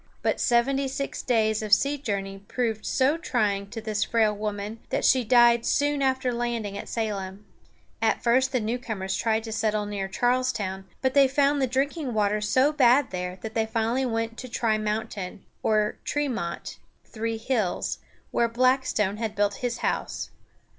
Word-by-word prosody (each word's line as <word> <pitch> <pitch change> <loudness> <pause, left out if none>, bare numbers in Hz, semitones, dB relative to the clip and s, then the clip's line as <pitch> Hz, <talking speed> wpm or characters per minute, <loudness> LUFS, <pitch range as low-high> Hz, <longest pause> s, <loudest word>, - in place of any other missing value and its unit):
But - - +1
seventy 270 +3 +2
six 275 +1 -4
days 220 -3 +1
of 215 -1 -5
sea 275 +8 +4
journey 200 -8 -4
proved 220 +1 -3
so 275 +5 +2
trying 205 - -1
to 225 - -6
this 215 -1 -1
frail 220 -2 +2
woman 210 +1 -4
that - - 0
she 255 -1 +4
died 235 0 +5
soon 290 +2 +1
after 260 -2 +1
landing 235 -4 -2
at 200 - -6
Salem. 205 -3 -3 0.6
At - - +1
first 255 +2 +3
the 255 - +1
newcomers 215 -4 -3
tried 220 -1 0
to 225 - -6
settle 215 -1 0
near 200 -2 -3
Charles´town; 230 -4 0 0.2
but 260 0 +2
they 280 -1 +6
found 280 +1 +2
the 265 - +2
drinking 270 0 -1
water 210 0 +1
so 260 +7 +3
bad 260 -1 +4
there 180 0 -4
that 220 -1 -5
they 220 -1 0
finally 230 +3 0
went 225 0 -2
to 255 - -6
Trimountain, 215 -4 -2 0.2
or 215 -1 +1
Tre´mont 250 -12 -3 0.3
("Three 225 0 -3
Hills"), 220 -5 -1 0.3
where 235 - +2
Blackstone 250 -4 +1
had 220 -1 -3
built 205 -1 +1
his 245 -1 -2
house. - - -2
225 Hz, 160 wpm, -26 LUFS, 210-255 Hz, 0.6 s, they